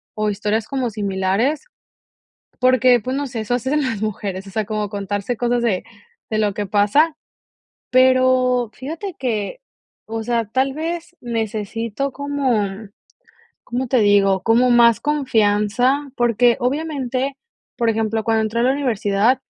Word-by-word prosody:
o 215 0 0
historias 210 +1 -1
como 265 -3 -2
similares, 200 +6 -1 1.0
porque, 255 -1 +5
pues, 255 +5 -3
no 285 0 -2
sé, 240 -3 -5
eso 220 +3 -1
hacen 265 +5 0
las 255 -6 -2
mujeres, 200 -2 -4
o - - -9
sea, 215 +2 -1
como 215 -1 -2
contarse 205 +3 -3
cosas 240 0 0
de 200 -6 0 0.5
de 215 - 0
lo 210 -2 +1
que 205 - -2
pasa, 210 - +3 0.8
pero 255 -1 +3
fíjate 325 +8 -6
que, 230 - -2 0.5
o 225 0 -4
sea, 235 -1 0
tal 265 +5 0
vez 335 +3 -5
necesito 225 +2 -3
como, 280 -5 0 1.0
¿cómo 250 +1 -3
te 255 0 +3
digo?, 200 -2 +3
como 240 +2 +4
más 235 -2 +5
confianza, 250 0 +1
porque, 240 0 +3
obviamente, 270 -1 -2 0.4
por 235 -1 +1
ejemplo, 220 0 -1
cuando 225 -1 +2
entré 220 +2 -1
a - - +2
la 260 - +3
universidad 235 -2 +1
235 Hz, 140 wpm, -20 LUFS, 210-260 Hz, 1.0 s, porque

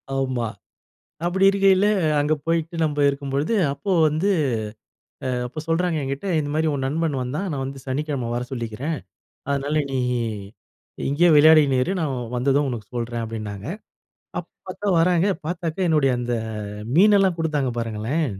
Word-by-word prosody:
ஆமா 130 -3 -1 0.8
அப்டி 190 +2 +2
இருக்கையில, 195 0 +4 0.3
அங்க 150 +2 +2
போயிட்டு 165 0 0
நம்ப 150 -1 -1
இருக்கும்பொழுது, 140 +6 -1 0.2
அப்போ 195 +8 -5 0.2
வந்து 160 +7 0 1.0
அ - - 0 0.2
அப்ப 130 +6 -9
சொல்றாங்க 170 0 +1
என்கிட்ட, 135 +6 -4
இந்த 145 -1 -3
மாதிரி 160 0 +1
உன் 135 - -2
நண்பன் 155 0 -1
வந்தான் 150 +10 -3
நான் 135 -2 -2
வந்து 135 0 -6
சனிக்கிழம 135 -3 -2
வர 120 - -1
சொல்லிக்கிறேன், 125 +6 -3 0.5
அதனால 140 +2 -1 0.2
நீ 130 - 0 1.0
நீ - - -6
இங்கேயே 165 +5 +4
விளையாடிகின்னு 145 -4 +6
இரு, 190 - -1
நான் 150 -5 -1 0.2
வந்ததும் 140 +3 +2
உனக்கு 115 -5 -5
சொல்றேன் 120 0 -3
அப்டின்னாங்க. 105 -2 -6 0.7
அப்ப - - -6 0.2
பார்த்தா 205 - -4
வராங்க 175 +1 +3 0.2
பார்த்தாக்க, 170 -1 -3
என்னுடைய 150 -5 +3
அந்த 120 0 -2 0.6
மீனெல்லாம் 195 -2 +5
குடுத்தாங்க 150 -5 0
பாருங்களேன் 115 +7 -1
145 Hz, 140 wpm, -23 LUFS, 130-165 Hz, 1.0 s, விளையாடிகின்னு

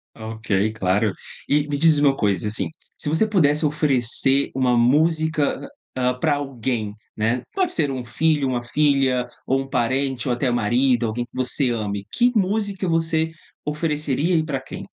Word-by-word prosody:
Ok, 110 0 -9 0.3
claro. 100 +1 +1 0.4
E 145 +1 +2
me 145 - -2
diz 160 +1 +5
uma 145 -2 +3
coisa, 100 -5 0
assim, 105 - -1 0.3
se 150 - -2
você 160 +8 +3
pudesse 155 -7 +2
oferecer 135 -2 +1
uma 125 -2 +2
música, 155 +3 +2 0.3
ah, 125 -1 +1
para 145 +4 +1
alguém, 125 -6 -3 0.2
né, 115 +3 0
pode 375 -2 0
ser 150 -4 0
um 130 -2 -4
filho, 145 +4 +1
uma 125 -2 -1
filha, 135 -1 +1 0.2
ou 135 +1 +2
um 135 - -7
parente, 130 +1 0
ou 125 - +2
até 125 +1 0
marido, 120 +2 +2
alguém 120 +2 -3
que 120 - -24
você 130 0 +1
ame, 100 -3 -3
que 245 0 +3
música 200 -1 0
você 160 -1 +1 0.3
ofereceria 150 +1 -1
e 160 -1 +2
para 140 -4 -2
quem? - - -8
135 Hz, 165 wpm, -22 LUFS, 120-155 Hz, 0.4 s, diz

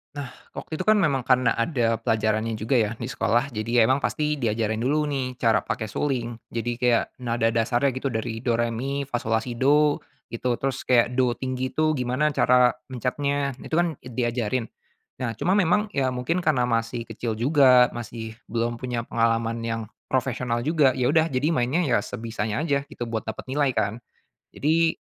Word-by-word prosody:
Nah, 140 -3 -5 0.2
waktu 155 - -6
itu 185 - -3
kan 215 - +6
memang 135 -6 +1
karena 125 -3 +3
ada 115 -2 +1
pelajarannya 110 0 0
juga 110 +4 0
ya, 110 -1 +1
di 120 - -4
sekolah. 120 +4 +1
Jadi 115 +1 +1
emang 130 +4 +4
pasti 150 +1 -1
diajarin 110 -2 -1
dulu 145 +5 0
nih, 130 -2 -2
cara 115 -2 +3
pakai 110 -1 -3
suling. 120 -3 -2 0.2
Jadi 120 +1 -2
kayak 125 -2 +1
nada 115 -2 0
dasarnya 120 +4 +1
gitu, 130 -1 -2
dari 110 0 -3
do, 120 0 0
re, 120 0 +1
mi, 135 +4 -3
fa, 120 - 0
so, 115 -1 -2
la, 110 - +3
si, 120 0 -6
do, 145 +3 +4 0.3
gitu. 120 +1 -1
Terus 135 -2 -2
kayak 125 0 +3
do 125 -2 +3
tinggi 130 +1 -3
itu 155 -1 +1
gimana 125 +4 +1
cara 125 -3 +4 0.2
mencetnya, 140 +2 -1
itu - - -9
kan, 170 -3 +1
eee, 125 - -9
diajarin. 120 -1 -1 0.5
Nah, 120 -3 -2
cuma 185 - +1
memang, 205 +3 +2
ya 130 -2 +1
mungkin 165 +8 -1
karena 125 -5 +2
masih 115 0 -2
kecil 115 0 -3
juga, 125 0 +5
masih 115 -1 -7
belum 115 +1 -2
punya 120 -1 -3
pengalaman 115 0 0
yang 115 0 -2 0.3
profesional 125 -2 -1
juga, 145 -2 +3
ya 125 -1 0
udah, 160 +1 +4
jadi 145 0 0
mainnya 140 +3 +1
ya 130 -8 +2
sebisanya 110 +2 -3
aja 145 -3 +1
gitu, 120 -3 -7
buat 110 -1 -3
dapet 110 -1 -6
nilai 140 -2 +1
kan. 105 +1 -1 0.6
Jadi 160 +2 +2
125 Hz, 185 wpm, -25 LUFS, 115-140 Hz, 0.6 s, kan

